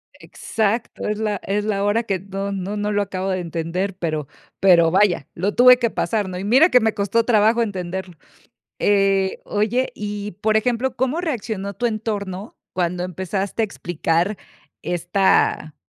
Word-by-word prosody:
Exacto, 220 +1 -3
es 210 0 -2
la 210 -2 -1
es 205 +1 -1
la 200 -2 0
hora 205 +3 +1
que 195 -4 -2
no 195 +1 -5
no 195 +1 -4
no 205 0 -1
lo 205 0 +1
acabo 190 -1 -4
de 185 -1 0
entender, 175 +3 -3
pero 155 -5 -2 0.3
pero, 175 -4 +5
vaya, 185 -5 +2
lo 195 +4 -1
tuve 250 +1 +7
que 240 -2 0
pasar, 215 -3 -1
¿no? 180 - -5
Y - - -5
mira 260 - +5
que 250 - +6
me 220 -2 +1
costó 205 +3 +1
trabajo 225 0 +3
entenderlo, 190 -3 -4 0.6
eh, 195 -1 +2
oye, 220 +5 0
y 205 0 -5
por 215 0 +2
ejemplo, 245 +3 0
¿cómo 260 +5 0
reaccionó 220 - -3
tu 240 +5 -3
entorno 210 -3 -3 0.2
cuando 180 0 -1
empezaste 190 +4 -3
a - - +3
explicar 175 0 -1 0.4
esta 175 -3 +1
200 Hz, 160 wpm, -21 LUFS, 185-220 Hz, 0.6 s, tuve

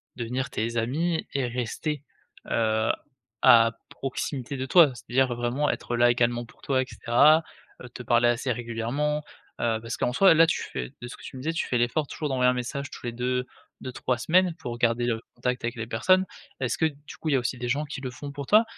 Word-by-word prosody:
devenir 125 +2 -3
tes 115 0 -2
amis 160 +9 0
et 135 -3 0
rester, 130 +5 -3 0.5
heu, 110 -1 +2 0.5
à 115 -1 +7 0.2
proximité 135 0 -4
de 130 0 -3
toi, 160 -1 +6
c'est-à-dire 125 +1 0
vraiment 120 +5 0
être 120 - -2
là 120 0 +5
également 120 0 +1
pour - - -21
toi 130 -2 +1
et - - -2
cetera, 150 +8 +4 0.4
heu, 125 - -9
te 125 - -9
parler 120 +1 +4
assez 125 +2 0
régulièrement, 120 +6 -2 0.4
heu, 115 -2 +1
parce 115 0 -5
qu'en 125 - 0
soit, 195 +1 +6
là, 165 +1 +6
tu - - 0
fais 60 -2 -6
de 120 - -6
ce - - -9
que - - -15
tu - - -9
me 130 - -7
disais, 160 +4 -1
tu - - -2
fais 120 - +1
l'effort 120 +5 0
toujours 150 -2 -4
d'envoyer 125 -1 +3
un - - +3
message 140 +3 -4
tous - - -10
les 120 - -2
2, 125 +1 -1 0.4
2-3 125 -1 -2
semaines 180 +4 +3
pour 120 -1 -5
garder 120 0 +2
le 115 -1 -1
contact 125 0 -2
avec 120 +1 -2
les 115 -1 -5
personnes. 185 +12 +3 0.3
Est-ce 130 -3 -1
que, 160 - +2
du 145 -1 -5
coup, 155 - -2
il - - +2
y - - +5
a - - +3
aussi 125 +1 -2
des 120 0 -4
gens 145 +4 0
qui 145 -2 -6
le 130 -2 -4
font 140 +3 -8
pour 140 -1 -6
toi 215 - +6
125 Hz, 225 wpm, -26 LUFS, 120-145 Hz, 0.5 s, à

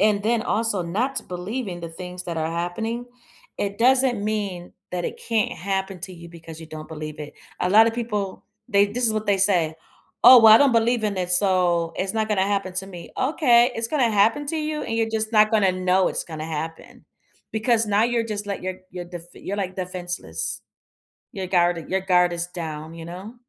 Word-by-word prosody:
and 205 -1 +3
then 225 +1 +1
also 220 -4 0
not 225 +11 -2
to - - -1
believe 200 +7 -4
in 175 -1 -6
the 170 - -6
things 180 +2 -8
that 170 -2 -4
are 160 0 -1
happening, 220 +8 -3 0.5
it 200 0 -3
doesn't 255 -2 +3
mean 200 -5 -3 0.2
that 180 -1 -2
it - - -4
can't 225 -3 +1
happen 190 0 -3
to 185 +2 -7
you 170 0 -11
because 165 -1 -11
you 160 - -9
don't 155 0 -9
believe 155 -1 -7
it. 150 - -8 0.3
A 180 - +1
lotta 220 +4 +6
people, 215 -4 -4 0.2
they 200 -2 +4
this 240 +4 -1
is 220 - +2
what 215 0 -2
they 200 -1 +3
say. 180 -5 +2 0.5
"Oh, 250 0 +11
well, 220 -1 +9
I - - +8
don't 280 -3 +4
believe 230 0 +2
in 205 -2 -1
it, 180 -1 -2
so, 180 -3 +2
it's 190 +3 -2
not 220 -1 0
gonna 195 -3 +1
happen 195 -2 -1
to 190 +1 -3
me." 175 -3 -10
"Okay. 255 -4 +4
It's 225 0 -2
gonna 260 -5 +2
happen 225 +8 +2
to 325 - -2
you, 305 -1 -2
and 225 - -3
you're 225 0 +1
just 220 0 -1
not 215 -1 +5
gonna 205 -4 +3
know 185 0 +2
it's - - -3
gonna 155 -2 -6
happen." 160 +1 -6 0.5
Because 225 0 +1
now 205 +1 +2
you're 235 -1 0
just 210 -2 -4
let 200 -2 -4
your 185 0 -3
your 180 -1 -6
defe 175 -1 -9
you're, 200 - -5
like, 185 -2 -3
defenseless. 180 - -5 0.7
Your 190 -1 -4
guarded 175 -2 +1
Your 190 +1 0
guard 180 -2 +3
is 170 0 -2
down, 160 -3 -6
you 165 - -8
know? 185 +7 -9
195 Hz, 210 wpm, -23 LUFS, 175-225 Hz, 0.7 s, Oh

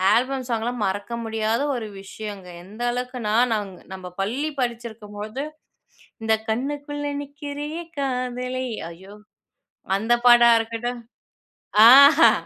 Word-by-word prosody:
Album 260 +1 0
song 230 -3 -1
எல்லாம் 245 -1 -3
மறக்க 205 +4 -3
முடியாத 225 +1 -1
ஒரு 225 -3 -4
விஷயம்ங்க. 195 -2 -8
எந்த 210 +5 -11
அளவுக்குனா 250 -3 -3 0.6
நம்ம 185 -1 -9 0.2
பள்ளி 265 +10 -1
படிச்சிருக்கும் 230 -4 -4
போது 215 +7 -4 0.8
இந்த 220 - +2 0.2
"கண்ணுக்குள்ள 290 +4 -3 0.2
நிக்கிறியே 290 +3 -6 0.2
காதலை 255 -1 -2 0.2
ஐயோ!" 190 +5 -13 0.8
அந்த 225 +3 0
பாடா 240 -1 +8
இருக்கட்டும். 230 +2 -4 0.9
ஆஹா 280 +4 +9
240 Hz, 105 wpm, -23 LUFS, 220-265 Hz, 0.9 s, ஆஹா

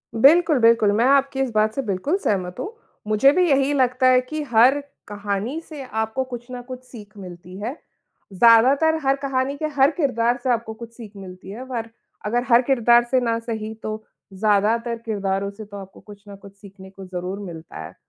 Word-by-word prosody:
बिल्कुल, 310 +6 +5
बिल्कुल, 230 -2 +4
मैं 220 +4 +2
आपकी 275 0 +2
इस 265 -2 -1
बात 215 0 +2
से 275 - -1
बिल्कुल 220 - -1
सहमत 180 -3 -1
हूँ, 415 - -5 0.3
मुझे 215 +6 +4
भी 360 +1 +2
यही 275 0 +2
लगता 255 -1 +2
है 255 0 +5
कि 305 +5 -5
हर 245 +5 +5 0.3
कहानी 205 +7 -3
से 300 -3 -8
आपको 220 +1 -2
कुछ 245 -1 -9
ना 250 -1 -6
कुछ 255 +1 -10
सीख 215 -5 -13
मिलती 180 -1 -11
है। 230 +5 -4 0.6
ज़्यादातर 255 - +5
हर 270 0 +2
कहानी 270 0 -1
के 310 - -3
हर 275 +1 +4
किरदार 245 -6 0
से 260 - -1
आपको 230 -2 -2
कुछ 230 +1 -11
सीख 225 -4 -10
मिलती 185 -1 -11
है 230 +5 -7
और 235 -3 -5 0.4
अगर 240 +3 0
हर 235 0 +6
किरदार 240 -2 +4
से 260 - +4
न 230 -1 0
सही 220 -2 -5
तो 215 0 -5 0.3
ज़्यादातर 215 +4 +1
किरदारों 200 -2 -2
से 210 +1 -10
तो 205 0 -10
आपको 195 -1 -11
कुछ 205 -1 -15
न 200 - -10
कुछ 200 0 -14
सीखने 195 -1 -14
को 195 0 -12
ज़रूर 185 +1 -5
मिलता 165 -2 -10
है। - - -11
230 Hz, 195 wpm, -22 LUFS, 205-260 Hz, 0.6 s, हर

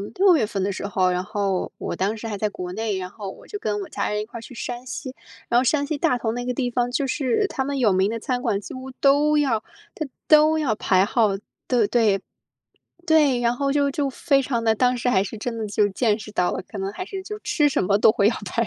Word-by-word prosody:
6 375 -2 +5
月 230 -8 +2
份 200 -3 -3
的 200 +1 0
时 195 - -5
候， 185 -2 +1
然 180 0 -1
后 200 -2 -2
我 - - -3
当 200 +4 0
时 225 +1 -6
还 205 -2 -4
在 210 +1 0
国 180 -3 -6
内， 215 -2 -2
然 180 0 -5
后 200 -2 -7
我 - - -15
就 415 - -5
跟 210 - -2
我 - - -7
家 - - -2
人 210 0 -1
一 - - -5
块 235 +1 -9
儿 - - -8
去 250 - -11
山 245 +1 -5
西。 260 0 -6 0.3
然 240 - +4
后 - - +1
山 285 +2 +2
西 305 -2 -2
大 250 -3 +1
同 225 0 -2
那 245 0 -4
个 250 - -1
地 245 -1 -1
方， 245 0 0
就 270 +1 0
是 290 - +1
它 265 - -2
们 280 -1 -2
有 220 -5 +4
名 190 +3 +2
的 230 - -3
餐 250 +1 -2
馆 200 0 0
几 - - -8
乎 260 +1 -8
都 290 +3 +3
要 240 -7 +1 0.3
它 310 - -3 0.2
都 310 +1 +6
要 245 -8 +1
排 185 -2 +3
号， 220 -2 +2 0.4
对 235 -5 +3
对。 210 -5 +2 0.9
对， 295 -6 +4
然 240 0 +1
后 275 +1 0
就 285 -1 +2
就 275 0 -1
非 275 +1 +2
常 245 -3 -1
的， 220 -1 +3
当 250 +2 +2
时 245 +1 0
还 195 -4 +3
是 215 +2 -7
真 230 +1 -4
的 220 - -3
就 205 0 +2
见 215 +1 +1
识 210 - -9
到 180 -3 +1
了， - - -3
可 210 - -8
能 195 0 -3
还 370 - -6
是 385 -1 -6
就 425 +1 -6
吃 295 -7 +2
什 - - 0
么 200 +2 +3
都 215 - +6
会 205 -2 +3
要 230 - +1
排 230 +5 -1
235 Hz, 285 characters per minute, -23 LUFS, 210-275 Hz, 0.9 s, 都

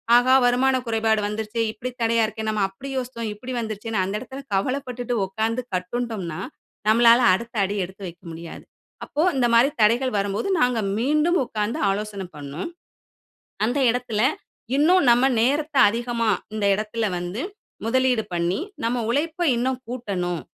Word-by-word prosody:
ஆஹா! 250 +2 +5
வருமான 260 +2 +3
குறைபாடு 225 -1 +2
வந்துருச்சே 215 +2 -3
இப்பிடி 240 +3 -6
தடையா 230 0 +3
இருக்கேன்னு 220 0 -3
நம்ம 215 -2 0
அப்பிடி 195 +8 -10
யோசித்தோம். 240 -3 -4
இப்பிடி 250 +5 -7
வந்துருச்சேன்னு 220 -2 -2
அந்த 195 +2 -3
இடத்தில 265 +3 -9
கவலப்பட்டுட்டு 250 +2 -2
உட்கார்ந்து 225 +5 -1
கட்டுண்டோம்ன்னா, 185 -3 -3 0.5
நம்மளால 230 +1 +6 0.2
அடுத்த 235 +2 -7
அடி 200 +2 -3
எடுத்து 190 +2 -13
வைக்க 175 0 -12
முடியாது. 165 0 -9 0.4
அப்போ 300 - -2
இந்த 245 -2 +3
மாரி 235 +4 +6
தடைகள் 240 +5 +3
வரும்போது 200 - -1
நாங்க 250 -3 +2 0.2
மீண்டும் 305 +8 +2
உட்கார்ந்து 215 -2 -2
ஆலோசனை 200 0 -2
பண்ணோம். 145 +3 -6 1.0
"அந்த 240 +5 0
இடத்தில 240 -3 -2 0.6
இன்னும் 345 +5 +4
நம்ம 245 +2 +5 0.2
நேரத்த 290 +5 +1
அதிகமா 235 0 -1 0.2
இந்த 215 -1 -2
இடத்தில 215 +2 -2
வந்து 175 +5 -4 0.4
முதலீடு 250 -1 +2
பண்ணி, 175 +4 0 0.3
நம்ம 240 +2 0
உழைப்ப 310 +6 -1 0.2
இன்னும் 255 +2 0
கூட்டணும். 190 -9 -3
230 Hz, 140 wpm, -23 LUFS, 210-250 Hz, 1.0 s, நம்மளால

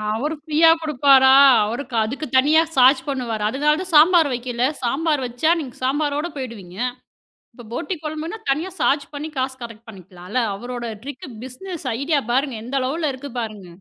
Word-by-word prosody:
அவரு 300 +8 -2
ஃப்ரீயா 315 +1 +4
குடுப்பாரா? 270 -3 +5 0.3
அவரு 230 +6 -3 0.2
அதுக்கு 265 +8 -4
தனியா 305 +5 +5
சார்ஜ் 260 +1 +5
பண்ணுவாரு. 240 -6 -3
அதுனாலதான் 300 +9 0
சாம்பார் 320 0 +6
வைக்கலை. 245 0 -1 0.2
சாம்பார் 285 +3 0
வச்சா 245 +7 0
நீங்கச் 255 -5 -8
சாம்பரோட 290 +3 0
போயிடுவீங்க. 215 -9 -8 0.8
இப்ப 240 0 -13
போட்டி 325 +8 -3
கொழம்புனா 315 +6 -5
தனியா 310 +7 0
சார்ஜ் 280 +4 +2
பண்ணி 295 +2 -5
காசு 260 0 -2
கலெக்ட் 230 0 -10
பண்ணிக்கலாம்ல. 185 +2 -6 0.2
அவரோட 240 +2 -6 0.2
ட்ரிக் 275 -1 -8 0.2
பிசினஸ் 315 +5 -8
ஐடியா 295 +1 +1
பாருங்க. 265 -1 0
எந்த 255 +3 -5
அளவுல 300 +4 -1
இருக்கு 260 +1 -9
பாருங்க. 215 -5 -6
265 Hz, 150 wpm, -21 LUFS, 240-300 Hz, 0.8 s, சாம்பார்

